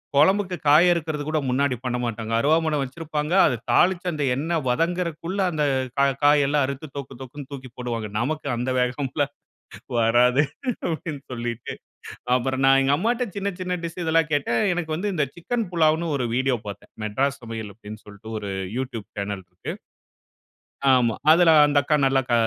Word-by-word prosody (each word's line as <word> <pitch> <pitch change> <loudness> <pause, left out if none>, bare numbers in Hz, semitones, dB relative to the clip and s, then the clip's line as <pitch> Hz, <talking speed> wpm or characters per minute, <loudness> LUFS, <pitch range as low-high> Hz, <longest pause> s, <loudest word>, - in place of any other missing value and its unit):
கொழம்புக்கு 185 +5 +3
காய் 155 +5 +7
அறுக்குறதுகூட 155 -2 -1
முன்னாடி 130 +1 +1
பண்ணமாட்டாங்க. 120 -3 -3
அருவாமன 155 +4 +2
வச்சுருப்பாங்க. 150 +3 -3
அத 125 - +2 0.2
தாளிச்சு 185 0 +3
அந்த 150 -3 -2
எண்ண 160 +5 -2
வதங்குறக்குள்ள 170 +5 -1
அந்த 155 -2 -1 0.3
கா 140 - +4 0.2
காயெல்லாம் 145 0 +4
அறுத்து, 140 +3 -5
தொக்கு, 135 -2 -7
தொக்குன்னு 135 +2 -9
தூக்கி 130 -2 -8
போடுவாங்க. 115 -4 -4
நமக்கு 145 +5 -2
அந்த 125 +2 -2
வேகம்ல்லாம் 135 +3 -1 0.7
வராது 120 +4 +4 0.4
அப்பிடீன்னு 160 -3 -4
சொல்லிட்டு 120 -1 -4 0.6
அப்புறம் 130 +1 -1
நான் 135 0 +6
எங்க 135 +1 +3
அம்மாட்ட 240 +6 0
சின்ன, 200 0 -2
சின்ன 180 0 -1
டிஷ் 170 +2 -5
இதெல்லாம் 165 -1 +2
கேட்டேன். 130 -5 +1
எனக்கு 160 -3 -2
வந்து 200 +4 -2
இந்த 150 -4 +1
சிக்கன் 225 +5 -3
புலாவ்ன்னு 160 -1 +2
ஒரு 125 - -1
வீடியோ 130 -1 +2
பார்த்தேன். 100 0 -9
"மெட்ராஸ் 135 +6 -1
சமையல்" 110 -2 -6
அப்பிடீன்னு 105 0 -11
சொல்ட்டு 105 +2 -10
ஒரு 100 -1 -5 0.3
யூட்யூப் 125 -5 -5
சேனல் 100 -1 -4
இருக்கு. 90 0 -7 1.2
ஆமா. 120 -3 +2 0.2
அதுல 165 +1 +6 0.2
அந்த 145 0 +2
அக்கா 150 +1 +2
நல்லா 135 0 +3
க - - +2
140 Hz, 150 wpm, -24 LUFS, 125-160 Hz, 1.2 s, காய்